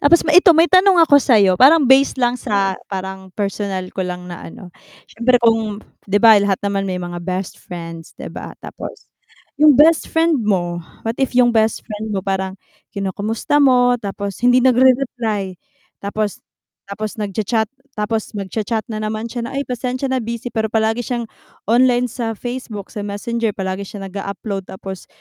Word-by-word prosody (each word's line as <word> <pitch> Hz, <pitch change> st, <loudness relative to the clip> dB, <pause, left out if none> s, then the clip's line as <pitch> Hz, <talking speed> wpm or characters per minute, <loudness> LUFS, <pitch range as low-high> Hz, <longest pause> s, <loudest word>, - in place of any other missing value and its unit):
tapos 330 Hz, +4 st, +4 dB
ma 315 Hz, -, +1 dB
ito 355 Hz, 0 st, +7 dB
may 330 Hz, -, +6 dB
tanong 370 Hz, 0 st, +5 dB
ako 285 Hz, -2 st, +6 dB
sa'yo 200 Hz, -8 st, +4 dB
parang 290 Hz, +3 st, +7 dB
base 265 Hz, +2 st, +4 dB
lang 245 Hz, -1 st, +1 dB
sa 195 Hz, -4 st, 0 dB
parang 190 Hz, 0 st, -6 dB
personal 200 Hz, -2 st, -2 dB
ko -, -, -4 dB
lang 180 Hz, -1 st, -4 dB
na 175 Hz, -, -8 dB
ano, 175 Hz, +1 st, -12 dB, 0.3 s
siyempre 245 Hz, +2 st, +2 dB
kung 220 Hz, -2 st, +1 dB, 0.3 s
'di 205 Hz, +1 st, +3 dB
ba, 220 Hz, -3 st, +8 dB
lahat 200 Hz, -1 st, +1 dB
naman 195 Hz, -1 st, -1 dB
may 185 Hz, -, -2 dB
mga 175 Hz, -1 st, -5 dB
best 185 Hz, +1 st, -4 dB
friends 165 Hz, -2 st, -9 dB
'di -, -, -8 dB
ba, -, -, -8 dB
tapos -, -, -9 dB, 0.5 s
yung 300 Hz, -3 st, +6 dB
bestfriend 325 Hz, -2 st, +3 dB
mo, 175 Hz, -4 st, -1 dB, 0.2 s
what 225 Hz, -, -1 dB
if 270 Hz, -, +1 dB
yung 240 Hz, -1 st, +4 dB
bestfriend 220 Hz, -1 st, -1 dB
mo, 195 Hz, -2 st, -1 dB
parang 190 Hz, 0 st, -2 dB, 0.3 s
kinukumusta 210 Hz, +8 st, -1 dB
mo 245 Hz, -2 st, +4 dB
tapos 200 Hz, 0 st, -5 dB
hindi 245 Hz, +1 st, +5 dB
nagre-reply 245 Hz, -6 st, +2 dB, 0.5 s
tapos, 205 Hz, 0 st, -3 dB, 0.5 s
tapos 210 Hz, +1 st, -5 dB
nagcha-chat 210 Hz, +2 st, -1 dB, 0.3 s
tapos 215 Hz, +1 st, -3 dB
magcha-chat 215 Hz, +3 st, -3 dB
na 215 Hz, -, -3 dB
naman 215 Hz, +1 st, -4 dB
siya 235 Hz, -2 st, -4 dB
na, 265 Hz, -, -8 dB
"Ay, 280 Hz, -, -1 dB
pasensya 255 Hz, +1 st, -3 dB
na 260 Hz, -, +1 dB
busy." 235 Hz, +1 st, -5 dB
Pero 220 Hz, -2 st, -1 dB
palagi 220 Hz, +1 st, 0 dB
siyang 240 Hz, -2 st, -2 dB, 0.5 s
online 245 Hz, 0 st, +3 dB
sa 225 Hz, -1 st, -3 dB
Facebook, 240 Hz, -4 st, -6 dB
sa 215 Hz, -, -6 dB
Messenger 225 Hz, +1 st, -2 dB
palagi 190 Hz, 0 st, -4 dB
siya 200 Hz, 0 st, -8 dB
nag-a-upload 200 Hz, 0 st, -5 dB
tapos 190 Hz, -1 st, -8 dB
220 Hz, 165 wpm, -19 LUFS, 195-245 Hz, 0.5 s, ba